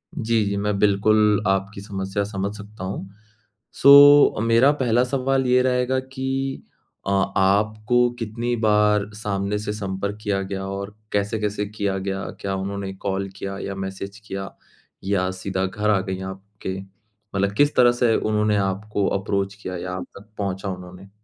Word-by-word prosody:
जी, 115 -1 +1
जी, 100 0 -1
मैं 105 0 0
बिल्कुल, 105 +1 +3
आपकी 95 +1 -1
समस्या 95 0 -3
समझ 100 0 -3
सकता 105 -1 -10
हूँ। 95 0 -5 0.7
सो 145 +1 +9
अ, - - -1
मेरा 115 +5 +5
पहला 120 -1 +3
सवाल 135 +1 0
ये 125 0 +4
रहेगा 130 0 +1
कि 135 0 -3 0.4
अ, - - 0 0.3
आपको 110 +5 +2
कितनी 115 +2 -2
बार 105 -1 +3
सामने 105 -1 -2
से 105 0 -3
संपर्क 100 0 -4
किया 100 -2 0
गया 95 0 -4
और 100 +1 -5 0.2
कैसे-कैसे 105 0 -1
किया 100 -2 -2
गया? 95 0 -3 0.2
क्या 95 -1 -2
उन्होंने 100 0 -4
कॉल 95 0 -3
किया 100 0 -5
या 100 - -5
मैसेज 95 +1 -6
किया 95 0 -5 0.5
या 95 -1 0
सीधा 95 -1 -1
घर 105 +3 -1
आ 105 -2 +4
गई 95 -1 -4
आपके? 95 0 -7 0.6
मतलब 100 0 +1
किस 145 +1 +3
तरह 120 -1 +6
से 120 -2 +2
उन्होंने 105 -1 +1
आपको 100 +1 -1
अप्रोच 100 0 -1
किया 95 -3 -6
या 90 +1 -5
आप 95 - -5
तक 100 +2 -15
पहुँचा 100 -1 -3
उन्होंने? 90 +1 -9
100 Hz, 160 wpm, -23 LUFS, 95-110 Hz, 0.7 s, सो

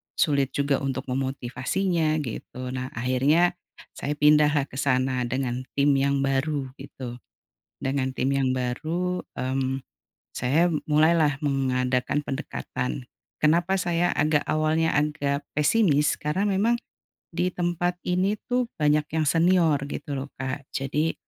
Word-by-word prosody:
sulit 140 -3 +1
juga 140 -1 +1
untuk 135 -1 -2
memotivasinya 135 +6 -1
gitu. 125 +1 -6
Nah 130 0 -3
akhirnya 140 +9 +2 0.4
saya 145 - -2
pindahlah 150 -1 +4
ke 130 - -9
sana 130 -2 +1
dengan 130 0 -2
tim 140 +1 +4
yang 140 0 +1
baru 135 0 0
gitu, 130 -3 -8 0.7
dengan 135 -1 -1
tim 130 +2 +1
yang 135 -2 +1
baru, 165 +9 -2 0.2
mmm, 130 +1 -1 0.5
saya 145 +8 +2 0.2
mulailah 155 -1 +4
mengadakan 130 -1 0
pendekatan. 130 -2 -4 0.3
Kenapa 175 +5 +2
saya 175 -1 +1
agak 150 0 +3
awalnya 155 +1 +2
agak 145 -1 -1
pesimis 150 -1 +3
karena 150 +7 -1
memang 205 +4 +2 0.6
di 180 +2 -1
tempat 175 0 0
ini 185 +3 +1 0.2
tuh 250 0 +2
banyak 150 0 +2
yang 155 -1 +1
senior 165 -3 +4
gitu 145 -1 -5
loh 135 - -4
Kak, 130 +1 -5
jadi 150 +4 0
145 Hz, 125 wpm, -25 LUFS, 130-165 Hz, 0.7 s, pindahlah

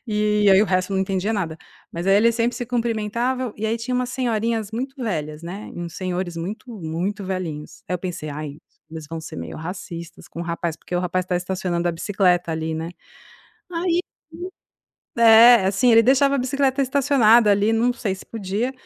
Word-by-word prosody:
E 210 -1 +2
aí, 190 +1 +7
o - - +4
resto 185 +1 0
eu - - 0
não 190 - +2
entendia 190 +2 -1
nada. 170 -7 -2 0.4
Mas 170 +2 -4
aí 195 - +5
eles 230 +2 +4
sempre 235 +1 0
se 245 -2 -4
cumprimentava. 235 +1 -1
E 215 - -5
aí 225 +1 +1
tinha 250 +2 -3
umas 250 0 -1
senhorinhas 230 -4 -1
muito 260 +4 -4
velhas, 155 -7 -3
né, 190 +5 -7
e 175 - -6
uns 170 0 -6
senhores 180 -2 -3
muito, 210 +9 -6
muito 180 +6 -3
velhinhos. 180 -6 -5
Aí 180 - -1
eu - - -2
pensei: 175 -3 -5
"Ai, 145 0 -6 0.3
eles 160 -2 -8
vão 165 0 -5
ser 160 - -9
meio 85 -1 -6
racistas 170 0 -8
com 170 - -8
o - - -2
rapaz". 170 -1 -3
Porque 180 - -8
o - - +2
rapaz 185 0 -1
está 180 0 -1
estacionando 180 -1 -2
a - - 0
bicicleta 180 -1 +1
ali, 160 0 -2
né. 160 +2 -4 0.8
Aí 340 0 0 1.2
é, 230 -2 +8
assim, 210 +6 +3
ele 230 0 +7
deixava 275 +2 +4
a - - +1
bicicleta 270 +1 +1
estacionada 250 -5 +4
ali, 205 +2 +2
não 235 +2 +2
sei 215 -5 -2
se - - -12
podia. 220 +3 -3
200 Hz, 195 wpm, -22 LUFS, 175-235 Hz, 1.2 s, é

